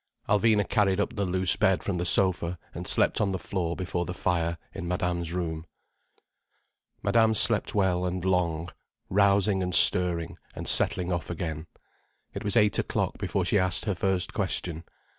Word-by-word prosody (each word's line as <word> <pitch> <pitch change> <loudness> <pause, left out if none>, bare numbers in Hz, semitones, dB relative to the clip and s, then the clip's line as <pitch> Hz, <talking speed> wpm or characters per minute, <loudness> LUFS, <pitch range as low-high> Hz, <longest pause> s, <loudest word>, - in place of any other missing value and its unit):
Alvina 105 0 +2
carried 100 -3 +1
up 100 - -1
the 100 -2 -1
loose 95 0 +3
bed 95 -4 +1
from 95 -4 -2
the 90 - -2
sofa, 90 -2 +1 0.2
and - - -6
slept - - +2
on 100 -2 +1
the 95 - -2
floor 90 -3 -3
before 90 -1 -3
the 90 +1 -6
fire 85 -2 -1 0.2
in 95 -3 -6
Madame's 85 -1 -2
room. 80 -3 -4 1.4
Madame 110 -1 +3
slept 110 -1 +2
well 95 -3 +1
and 90 0 -3
long, 85 -3 0 0.4
rousing 100 0 +3
and 90 -1 -1
stirring 85 -2 +4 0.2
and - - -7
settling 90 -3 +2
off 85 -2 -3
again. 80 -2 -5 0.7
It 100 - -6
was 105 +3 0
eight 105 -2 +3
o'clock - - -2
before - - -2
she 100 - +2
asked 90 -2 0
her 105 - 0
first 95 0 -1
question. 85 -1 -3
90 Hz, 165 wpm, -27 LUFS, 85-100 Hz, 1.4 s, stirring